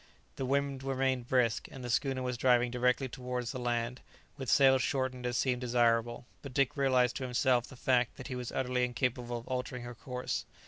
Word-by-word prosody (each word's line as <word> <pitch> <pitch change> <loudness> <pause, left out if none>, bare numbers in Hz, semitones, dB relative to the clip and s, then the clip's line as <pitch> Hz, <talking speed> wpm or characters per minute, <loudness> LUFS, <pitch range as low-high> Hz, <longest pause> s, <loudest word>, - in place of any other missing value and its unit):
The 130 - -2
wind 140 0 0
remained 130 -2 0
brisk, 125 -3 +1
and 135 - -9
the 120 - -5
schooner 130 +1 0
was 125 -1 -2
driving 125 0 +3
directly 125 +2 +1
towards 125 -1 -4
the 130 - -5
land, 120 0 -2 0.3
with 135 -4 -5
sails 135 -2 +6
shortened 130 -1 -1
as 120 -1 -1
seemed 125 -2 +1
desirable; 120 -1 +1 0.2
but 135 -3 -9
Dick 140 -2 +2
realized 130 -3 +3
to 135 - -4
himself 125 -1 +2
the - - -12
fact 125 -1 +1
that 130 - -7
he 130 - -4
was 125 -1 -5
utterly 125 -1 0
incapable 120 -1 -1
of 115 - -10
altering 125 -1 -3
her 120 0 -7
course. 125 +2 -4
125 Hz, 195 wpm, -32 LUFS, 120-130 Hz, 0.3 s, sails